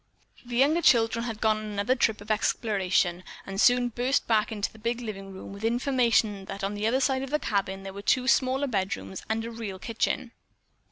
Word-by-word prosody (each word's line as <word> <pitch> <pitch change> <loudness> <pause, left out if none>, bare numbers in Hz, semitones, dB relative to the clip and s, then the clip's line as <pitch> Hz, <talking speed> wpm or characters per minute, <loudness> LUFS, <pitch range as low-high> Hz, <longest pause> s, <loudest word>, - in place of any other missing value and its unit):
The 240 -1 -6
younger 290 +7 +4
children 230 -4 +3
had 225 -3 -5
gone 215 -1 +3
on 215 - -6
another 205 +3 0
trip 220 -4 +1
of 210 +1 -5
exploration, 195 -5 +1 0.2
and 195 +1 -2
soon 245 0 +4
burst 250 +4 0
back 220 -2 +2
into 205 -2 -3
the 220 - -15
big 235 +2 -2
living 195 -4 -7
room 190 +1 -9
with 200 - -10
the 225 - +1
information 235 -5 +1
that 195 +1 -7
on 195 +1 -1
the 205 +1 -1
other 255 +4 +2
side 265 -1 +1
of 270 - -5
the 300 - +1
cabin 195 -6 -2
there 195 0 -7
were 200 - -7
two 255 +4 +1
smaller 265 +1 +3
bedrooms 190 - -3
and 225 +1 -1
a 230 - -5
real 225 -4 -6
kitchen. 230 +3 -2
220 Hz, 215 wpm, -27 LUFS, 200-245 Hz, 0.2 s, younger